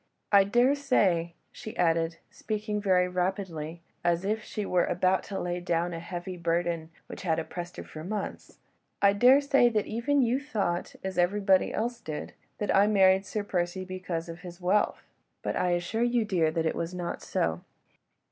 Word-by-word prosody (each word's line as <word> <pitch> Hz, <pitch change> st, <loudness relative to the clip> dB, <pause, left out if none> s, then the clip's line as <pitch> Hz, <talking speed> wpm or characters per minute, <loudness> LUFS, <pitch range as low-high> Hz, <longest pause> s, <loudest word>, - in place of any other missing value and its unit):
I 200 Hz, -1 st, +7 dB
daresay," 240 Hz, -8 st, +2 dB, 0.2 s
she 220 Hz, -3 st, -9 dB
added, 165 Hz, -1 st, +1 dB
speaking 210 Hz, -1 st, -3 dB
very 185 Hz, -3 st, +3 dB
rapidly, 180 Hz, -3 st, -3 dB, 0.2 s
as 175 Hz, +1 st, +1 dB
if 215 Hz, +2 st, 0 dB
she 210 Hz, -1 st, -4 dB
were 180 Hz, -2 st, +2 dB
glad 180 Hz, -, -1 dB
at 180 Hz, -, -16 dB
last 185 Hz, +1 st, +3 dB
to 195 Hz, -, -4 dB
lay 175 Hz, 0 st, -2 dB
down 175 Hz, 0 st, -1 dB
a 165 Hz, -, -4 dB
heavy 175 Hz, +2 st, -6 dB
burden, 170 Hz, -1 st, -1 dB, 0.2 s
which -, -, -9 dB
had 165 Hz, -4 st, 0 dB
oppressed 175 Hz, +2 st, -5 dB
her -, -, -5 dB
for 155 Hz, -, -9 dB
months, 205 Hz, +3 st, -5 dB, 0.4 s
"I 200 Hz, 0 st, +5 dB
daresay 265 Hz, +3 st, +5 dB
that 215 Hz, -3 st, 0 dB
even 260 Hz, +5 st, +1 dB
you 245 Hz, +3 st, +1 dB
thought—as 190 Hz, -7 st, -3 dB
everybody 195 Hz, +1 st, +3 dB
else 235 Hz, +2 st, -2 dB
did—that 155 Hz, +6 st, -4 dB
I 200 Hz, +2 st, +6 dB
married 190 Hz, -2 st, +4 dB
Sir 210 Hz, -, -2 dB
Percy 185 Hz, -1 st, -2 dB
because 185 Hz, -3 st, -4 dB
of 165 Hz, 0 st, -8 dB
his 175 Hz, -1 st, -10 dB
wealth—but 190 Hz, +3 st, -2 dB
I 180 Hz, -, +1 dB
assure 175 Hz, +6 st, -1 dB
you, 240 Hz, -1 st, +2 dB
dear, 175 Hz, -6 st, +2 dB
that 160 Hz, +1 st, -1 dB
it 160 Hz, -, +1 dB
was 170 Hz, +2 st, -3 dB
not 175 Hz, -1 st, -4 dB
so. 80 Hz, +1 st, -1 dB
185 Hz, 170 wpm, -28 LUFS, 170-210 Hz, 0.4 s, I